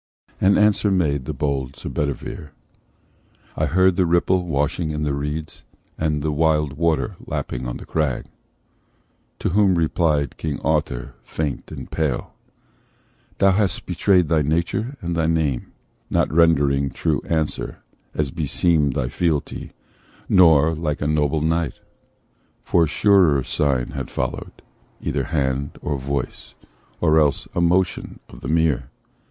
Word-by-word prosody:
And 95 +1 +5
answer 105 0 +3
made 75 -8 +1
the - - -3
bold 70 -2 -2
Sir - - -8
Bedivere: 75 +1 -4 1.0
"I - - 0
heard 95 +1 +3
the 90 -2 +3
ripple 90 +1 +2
washing 75 +2 0
in 75 0 -2
the 75 -2 0
reeds, 75 +3 -4 0.3
And 75 -2 -1
the 80 - 0
wild 75 -2 +1
water 80 +1 0
lapping 60 0 -4
on - - -4
the - - -11
crag." 75 -6 -1 1.1
To - - -1
whom 95 0 +3
replied 80 -4 +1
King 75 -3 -3
Arthur, 70 -4 -1
faint 75 -4 -4
and - - -8
pale: 75 -6 -2 1.0
"Thou 95 - +5
hast 95 -2 0
betrayed 90 0 +2
thy 80 0 +2
nature 85 - -1
and 85 -2 -2
thy 80 -1 +1
name, 80 -6 0 0.4
Not - - +1
rendering 70 -4 +3
true - - -1
answer, 80 -2 -2 0.3
as 75 -3 -1
beseemed 75 -1 +1
Thy 65 -3 -1
fealty, 80 +2 -2 0.6
nor 80 -3 +5
like 80 -2 -3
a 75 - 0
noble 75 0 +1
knight: 80 0 0 0.8
For 85 -2 +3
surer 85 -5 +4
sign 65 -4 0
had 65 -2 -5
followed, - - -4 0.4
either - - -2
hand, 70 -2 -1
Or 75 -2 -3
voice, 70 +2 -4 0.4
or 80 +1 +4
else 75 -3 +1
a 85 - 0
motion 90 +1 +1
of - - -12
the - - -6
mere. 80 -4 +1
75 Hz, 140 wpm, -22 LUFS, 70-85 Hz, 1.1 s, And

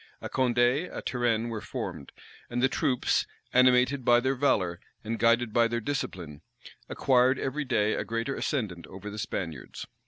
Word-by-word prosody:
A - - -6
Condé, 125 +5 +2
a - - -5
Turenne 120 -2 0
were 110 -2 -4
formed; 70 - -6 0.4
and 120 - -2
the - - +6
troops, 130 -2 0 0.3
animated 125 +1 +4
by 120 0 +5
their 130 +2 0
valor, 95 -11 +1 0.2
and 115 +1 -3
guided 115 -1 +3
by 115 0 +4
their 120 0 -2
discipline, 90 - -4 0.5
acquired 130 0 +3
every 145 +3 -2
day 110 -4 +1
a - - -1
greater 115 +4 -2
ascendant 100 - -3
over 100 +2 -8
the 105 - -7
Spaniards. 80 -10 -5
120 Hz, 160 wpm, -28 LUFS, 105-130 Hz, 0.5 s, the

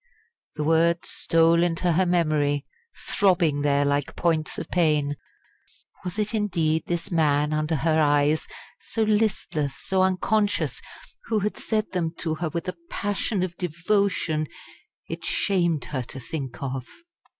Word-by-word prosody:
_" - - -48 0.5
The 150 - -2
words 165 +2 +2
stole 165 0 +3
into 175 +1 +1
her 180 +3 +2
memory, 155 -5 +1 0.3
throbbing 170 -7 +2
there 145 0 +2
like 145 0 0
points 160 -3 0
of - - -5
pain. 150 -4 +2 0.9
Was 180 +2 -5
it 210 +1 -1
indeed 170 -7 +1
this 175 +2 -3
man 150 -2 +2
under 155 +1 0
her 160 +1 +2
eyes 145 +1 +3 0.3
so 225 - -2
listless, 210 -10 0
so 190 -1 0
unconscious 205 +2 +1 0.4
who 220 - 0
had 210 +2 -1
said 215 -1 -2
them 170 -3 -2
to 160 -2 -2
her 160 +1 -2
with 170 +2 -4
a 180 - -3
passion 205 -1 -1
of 180 -2 -3
devotion 170 -2 0 0.6
it - - -6
shamed 175 -6 +1
her 135 -3 -3
to 125 +2 -8
think 135 -2 -6
of. 130 -2 -4
165 Hz, 145 wpm, -25 LUFS, 150-185 Hz, 0.9 s, stole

